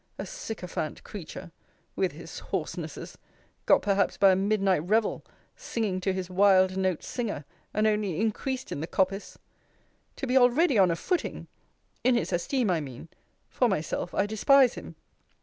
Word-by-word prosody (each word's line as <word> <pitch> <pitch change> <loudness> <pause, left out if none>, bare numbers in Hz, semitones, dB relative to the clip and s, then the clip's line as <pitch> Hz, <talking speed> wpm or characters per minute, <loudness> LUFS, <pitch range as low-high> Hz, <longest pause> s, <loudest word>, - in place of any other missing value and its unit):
A - - -4
sycophant 210 - -5
creature! 185 -2 -9 0.4
With - - 0
his - - -9
hoarsenesses - - -5 0.5
got - - +5
perhaps 200 -1 +1
by 195 -1 +6
a - - +4
midnight 195 -1 +2
revel, 215 +4 +1 0.3
singing 220 - -3
to 190 - +1
his 185 -1 -3
wild 185 0 +4
note 185 -3 0
singer, 215 - -4 0.3
and 215 +1 +1
only 210 -5 0
increased 255 +4 -2
in - - -3
the 160 - -4
coppice! 195 +2 -1 0.8
To - - -4
be 255 0 -1
already 255 - +4
on 185 -2 +6
a 170 - +1
footing! 360 - -2 0.6
In 255 0 +4
his 235 - -1
esteem, 215 +5 0
I 165 -3 +1
mean: 135 +2 -9 0.4
for 250 - +1
myself, 175 -1 -2
I 195 - +2
despise 250 +5 +4
him. - - -9
200 Hz, 155 wpm, -27 LUFS, 185-235 Hz, 0.8 s, by